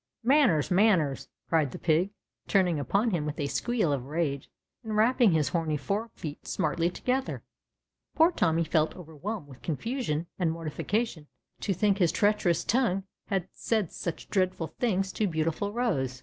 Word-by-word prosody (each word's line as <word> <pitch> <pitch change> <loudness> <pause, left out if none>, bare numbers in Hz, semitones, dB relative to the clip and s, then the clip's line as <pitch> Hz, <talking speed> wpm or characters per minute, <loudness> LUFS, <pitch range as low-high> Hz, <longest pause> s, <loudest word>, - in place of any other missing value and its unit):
Manners, 245 - +4
manners!" 180 -8 +3 0.2
cried 160 -4 +2
the - - -6
pig, 170 +3 +2 0.4
turning 180 -6 +2
upon 200 - +1
him 170 -5 0
with 150 +1 -4
a 145 - 0
squeal 210 +1 0
of 130 -3 -3
rage 145 -3 -2 0.3
and 220 -1 -4
ra]3ping 225 0 +4
his 155 -3 +2
horny 160 -3 0
fore 205 +10 -2
feet 150 -3 -7
smartly 165 +3 0
together. 255 +8 -2 0.7
Poor 325 +2 +5
Tommy 165 - +2
felt 160 -1 +1
overwhelmed 180 +2 -6
with 130 -2 -14
confusion 175 - -2
and 170 -3 +2
mortification 165 +2 -2 0.3
to 205 - -2
think 200 +2 +2
his 175 -4 +4
treacherous 205 -5 +2
tongue 215 -6 +1 0.2
had 190 -3 -1
said 215 -7 -1
such 170 - -5
dreadful 185 -4 0
things 195 -5 +1
to 210 +3 0
beautiful 165 +4 -1
Rose - - -13
THE 245 - 0
RED 235 -5 +2
VELVET 130 -1 -1
PIG. 125 - -13
180 Hz, 170 wpm, -28 LUFS, 155-215 Hz, 0.7 s, Poor